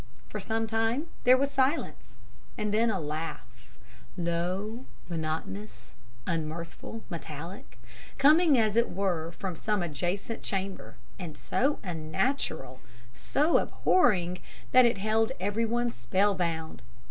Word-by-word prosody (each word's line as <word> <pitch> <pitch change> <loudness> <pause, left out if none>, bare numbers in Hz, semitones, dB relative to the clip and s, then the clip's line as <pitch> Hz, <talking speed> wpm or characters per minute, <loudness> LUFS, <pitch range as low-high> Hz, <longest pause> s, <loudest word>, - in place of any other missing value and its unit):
For 210 - -4
some 225 +3 -1
time 225 +7 0 0.2
there 255 +1 +8
was 280 +1 0
silence; 270 +4 0 0.4
and 210 -2 -1
then 225 +2 +3
a 195 -4 0
laugh 155 -1 -4 0.7
low, 185 +8 -2 0.2
monotonous, 130 - -4 0.3
unmirthful, 165 +6 -4
metallic 165 +1 -7 0.4
coming 305 +1 +6
as 215 -2 +2
it 235 +1 +3
were 175 -4 -1
from 180 +1 -4
some 210 +2 0
adjacent 175 +8 -2
chamber, 195 -1 -3 0.2
and 170 -5 -6
so 280 +3 +1
unnatural, 160 - -2 0.3
so 300 - +2
abhorring, 180 - +2 0.3
that 255 0 +8
it 235 -3 +3
held 220 +4 +1
everyone 230 +4 0
spell 190 - +1
bound. 165 -3 -2
195 Hz, 115 wpm, -29 LUFS, 165-230 Hz, 0.7 s, there